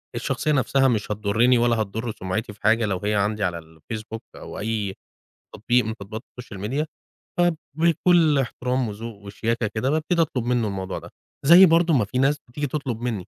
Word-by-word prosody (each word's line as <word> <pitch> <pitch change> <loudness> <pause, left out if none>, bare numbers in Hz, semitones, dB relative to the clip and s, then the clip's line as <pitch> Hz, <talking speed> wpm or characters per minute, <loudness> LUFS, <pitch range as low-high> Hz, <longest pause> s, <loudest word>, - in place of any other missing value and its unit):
الشخصية 155 - -1
نفسها 135 -1 +3
مش 110 -3 0
هتضرني 110 +4 +3
ولا 120 0 +3
هتضر 110 +3 -3
سمعتي 105 +3 -3
في 105 - -23
حاجة 115 0 +3
لو 95 -3 -1
هي 105 +1 +1
عندي 105 +1 0
على 85 -2 -1
الFacebook 110 +8 -8 0.2
أو - - -8
أي 105 -2 -2 0.6
تطبيق 120 +1 +2
من 110 - -2
تطبيقات 110 +2 -7 0.2
الSocial 110 -5 -10
Media، 140 +9 -1 0.5
فبكل 165 -1 +2
احترام 125 -1 -1
وذوق 110 +2 -7
وشياكة 115 +3 -2
كده 110 +5 0
بابتدي 160 +3 +1
أطلب 140 -7 -1
منه 120 -2 +1
الموضوع 95 -1 -4
ده. - - -12 0.4
زي 175 +5 +9
برضو 165 -1 +4
ما 115 -7 +3
في 125 - -4
ناس 135 +3 +3
بتيجي 145 +4 -3
تطلب 130 -5 -3
مني، 115 -7 -3
115 Hz, 175 wpm, -24 LUFS, 105-140 Hz, 0.6 s, زي